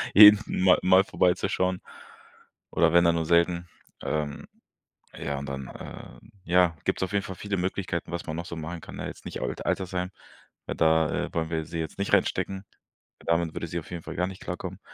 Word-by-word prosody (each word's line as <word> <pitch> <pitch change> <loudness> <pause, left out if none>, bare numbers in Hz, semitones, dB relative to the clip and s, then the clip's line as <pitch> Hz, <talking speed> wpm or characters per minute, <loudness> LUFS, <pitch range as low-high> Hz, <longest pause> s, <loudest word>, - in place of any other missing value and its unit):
jeden 105 +1 +11 0.2
mal 95 -1 +6
mal 95 +1 +6
vorbeizuschauen. 90 0 +1 0.9
Oder 85 0 +3
wenn 85 - +6
dann 85 - +4
nur 80 -1 0
selten. 85 +1 +2 0.4
Ähm, 75 -2 -3 0.7
ja, 70 -1 -3
und 70 - -6
dann, 70 -1 -5
äh - - -10 0.3
ja, 90 -1 +4
gibt - - 0
es - - +2
auf 95 - -9
jeden 100 -1 +1
Fall 95 - -6
viele 100 +1 -3
Möglichkeiten, 90 -2 -2
was 85 -1 -4
man 80 - -3
noch 85 - -4
so 85 - -6
machen 80 +2 -6
kann, - - -10
ne? - - -4
Jetzt - - -10
nicht - - -5
Al - - -1
Altersheim, 90 -1 -1 0.6
weil - - -3
da, 80 0 +2
äh, - - -16
wollen 80 -1 -1
wir 80 -1 -1
sie 85 +1 -6
jetzt 80 +4 -5
nicht 100 - -1
reinstecken. 95 0 +1 0.5
Damit 85 -1 0
würde 85 - -3
sie 85 - -4
auf 80 - -12
jeden 85 -2 -5
Fall 80 - -7
gar 90 +1 +1
nicht 95 0 -9
klarkommen. - - -5
85 Hz, 205 wpm, -27 LUFS, 80-95 Hz, 0.9 s, jeden